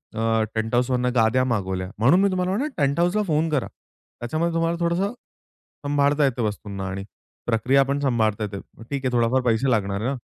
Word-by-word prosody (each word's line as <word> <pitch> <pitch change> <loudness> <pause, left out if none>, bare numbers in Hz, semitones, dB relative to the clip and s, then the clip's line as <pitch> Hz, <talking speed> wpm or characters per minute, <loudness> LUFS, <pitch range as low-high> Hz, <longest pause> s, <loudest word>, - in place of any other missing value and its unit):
अ, 115 0 +1
टेंटहाउसवरून 125 +3 0
गाद्या 115 +2 +3
मागवल्या 95 -6 -2
म्हणून 140 +11 +5
मी 200 - +3
तुम्हाला 185 -1 -1
म्हणल, 250 +10 0
टेंटहाउसला 170 +8 +1
फोन 160 -2 0
करा. 145 -5 0 0.5
त्याच्यामध्ये 155 +8 -1
तुम्हाला 165 +1 0
थोडसं 175 +4 0
सांभाळता 145 - -3
येते 130 -3 -1
वस्तूंना 100 -3 -4
आणि 95 +1 -5 0.4
प्रक्रिया 125 +4 +3
पण 140 +1 -1
सांभाळता 110 -6 +1
येते. 100 -1 -4 0.2
मग 115 - -11
ठीक 140 -2 -3
आहे, 125 - +1
थोडाफार 120 +2 +2
पैसे 120 +3 +2
लागणार 100 -2 0
आहे 120 - -1
ना. 140 - -1
130 Hz, 175 wpm, -23 LUFS, 110-155 Hz, 0.5 s, म्हणून